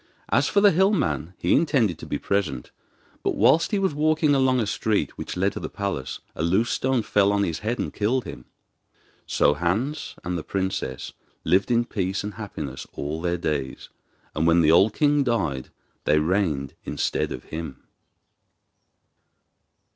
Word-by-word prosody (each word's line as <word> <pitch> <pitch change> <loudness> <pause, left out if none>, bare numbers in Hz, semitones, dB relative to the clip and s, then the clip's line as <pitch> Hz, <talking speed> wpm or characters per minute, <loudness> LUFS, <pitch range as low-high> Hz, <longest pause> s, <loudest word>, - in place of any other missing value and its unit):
As - - +3
for 200 - +3
the 205 -1 +7
hill 190 +4 +4
man 85 - -1
he 85 - +1
intended 130 - +2
to - - -9
be - - -2
present; 100 -3 -2 0.5
but - - -1
whilst 165 - +4
he 210 - 0
was 190 -5 +1
walking 155 0 +2
along 130 -2 +3
a 115 - +1
street 105 0 -1
which - - -6
led 95 +2 +2
to - - -5
the - - -5
palace 100 -10 -4
a - - -4
loose 95 +9 +2
stone 130 -3 +1
fell 100 -1 +3
on 100 0 +2
his 85 -5 -2
head 115 +3 -2
and - - -3
killed 115 +5 0
him. 60 - -9 0.8
So 70 - +3
Hans 100 - -2
and 90 0 -2
the - - -7
princess 95 -10 -3 0.3
lived 95 +8 +2
in 120 0 +2
peace 95 -3 -2
and 105 0 -5
happiness 75 -11 -7
all 75 +3 -4
their 90 0 0
days, 70 -5 -3 0.5
and 80 +2 +1
when 85 +1 +5
the 80 -1 +5
old 95 +6 +5
king 145 -1 +3
died 85 - -1 0.4
they 75 - +4
reigned 75 -4 0
instead 75 - -1
of - - -6
him. 80 -4 -7
100 Hz, 170 wpm, -24 LUFS, 80-125 Hz, 0.8 s, the